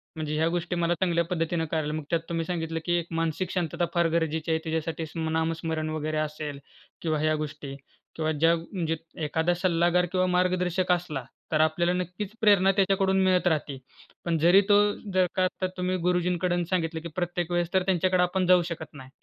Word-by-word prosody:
म्हणजे 155 -1 -3
ह्या 160 +1 +2
गोष्टी 175 +1 -2
मला 170 0 +1
चांगल्या 170 0 +1
पद्धतीनं 165 -1 -1
करायला. 155 -2 -1
मग 155 0 -3
त्यात 170 - +2
तुम्ही 165 -1 -1
सांगितलं, 165 -1 -3
की 175 - +1
एक 170 - -6
मानसिक 165 +2 -1
शांतता 175 -1 -1
फार 170 -1 +3
गरजेची 160 0 -1
आहे 160 - +2
तिच्यासाठी 160 0 -2
स्म 160 +1 -4
नामस्मरण 160 -1 -1
वगैरे 155 0 -2
असेल 150 -2 -3 0.4
किंवा 155 -2 0
ह्या 155 +1 +2
गोष्टी 145 -2 -5 0.4
किंवा 155 -1 0
ज्या 165 +2 +3
म्हणजे 165 -1 -3 0.3
एखादा 160 +3 +1
सल्लागार 175 0 +2
किंवा 185 -1 +2
मार्गदर्शक 180 0 +1
असला, 170 -7 -1 0.3
तर 155 -1 +3
आपल्याला 170 +3 +2
नक्कीच 180 +3 -4
प्रेरणा 200 -3 +5
त्याच्याकडून 195 0 +2
मिळत 185 -1 +3
राहती. 150 -4 0 0.5
पण 170 -1 +1
जरी 175 +5 +6
तो 205 - +7 0.4
जर 185 -1 +4
का 185 - +2
आत्ता 185 +1 -1
तुम्ही 180 0 0
गुरुजींकडून 180 0 +1
सांगितलं, 165 -3 -1
की 170 - -6
प्रत्येक 175 -1 -2
वेळेस 175 0 0
तर 190 -1 +3
त्यांच्याकडे 185 0 +2
आपण 180 +1 0
जाऊ 180 -1 +6
शकत 160 -1 -5
नाही. 130 -3 -11
170 Hz, 185 wpm, -27 LUFS, 160-180 Hz, 0.5 s, तो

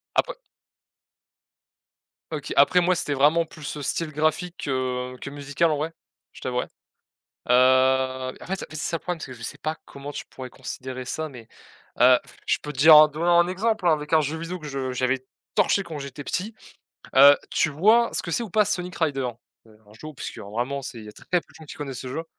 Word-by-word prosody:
Après - - +1 2.0
OK, - - -4
après 180 - +6
moi 180 +1 +3
c'était 150 - -2
vraiment 150 +5 +4
plus 155 -2 -8
le 145 - -5
style 160 +3 -2
graphique 155 +4 -1
que 125 -2 -2
que 140 - -6
musical 145 +3 0
en 155 - +1
vrai 155 +3 -3 0.4
je - - -14
t'avouerais. 125 -1 -2 0.8
Heu, - - +6 0.9
en - - -10
fait 190 +1 -3
c'est - - -10
ça 160 +2 -2
le - - -9
problème 180 -2 -3
parce - - -7
que 130 - -9
je 120 - -13
sais 140 - -6
pas 155 +3 -3
comment 140 +1 -9
tu - - -6
pourrais 130 -1 -8
considérer 130 +1 -7
ça 155 +5 -4
mais, 125 -6 -12 0.5
heu, 125 0 +7 0.3
je - - +3
peux 150 - -5
te 135 - -12
dire 155 +2 +9
en 155 0 +9
donnant 170 +3 +2
un 175 0 +4
exemple 210 +1 -1
hein, 170 - +6
avec 150 0 -3
un 155 - +5
jeu 150 +2 -3
vidéo 170 +3 -5
que 155 - -9
je 135 -2 -3
j'avais 130 +1 0 0.4
torché 200 - +3
quand 160 -4 -7
j'étais 140 0 -7
petit. 205 +10 -3 0.6
Heu, 140 +1 +9
tu 155 - +1
vois 215 +10 +4
ce - - 0
que - - -7
c'est 235 - 0
ou 225 - -7
pas 210 +1 +4
Sonic 180 -1 -3
Riders? 135 -6 0 0.4
Heu, 110 -1 -20
un 105 - -17
jeu 115 +8 -11
obscur 130 -8 -8
vraiment 125 +5 -2
c'est 120 -2 -7
il 110 - -11
y - - -11
a - - -10
très - - -17
peu 180 - +4
de - - -21
gens 160 - -13
qui - - -9
connaissent 135 -4 -6
ce - - -7
jeu. 160 +6 -4
150 Hz, 220 wpm, -24 LUFS, 130-170 Hz, 2.0 s, dire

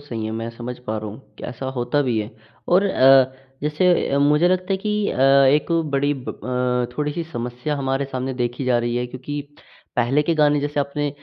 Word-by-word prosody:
सही 115 -6 -5
है, 110 - -3
मैं 115 +1 -4
समझ 125 +1 -6
पा 110 +1 -2
रहा 110 - -6
हूँ, 110 - -10 0.2
कि - - -8
ऐसा 125 +2 -6
होता 125 +4 0
भी 120 -4 0
है। 105 +1 -3 0.4
और 185 +3 +4
अ, 135 -7 +5 0.3
जैसे 150 +5 +1 0.2
अ, 140 - +1
मुझे 150 +4 +4
लगता 185 +1 0
है - - +2
कि 210 +1 -1
अ, 130 - -3
एक 135 +3 +5 0.2
बड़ी 140 +1 +2
ब 130 -2 -9 0.6
अ, - - -17
थोड़ी-सी 150 +3 -2
समस्या 125 +5 -3
हमारे 135 0 -1
सामने 130 -1 -4
देखी 120 +1 -2
जा 125 -2 +3
रही 120 0 -1
है 125 0 -1
क्योंकि, 130 +4 -6 0.6
पहले 130 +5 +2
के 165 +2 0
गाने 150 -1 +3
जैसे 145 0 -1
आपने 145 +1 -2
135 Hz, 210 wpm, -22 LUFS, 125-150 Hz, 0.6 s, अ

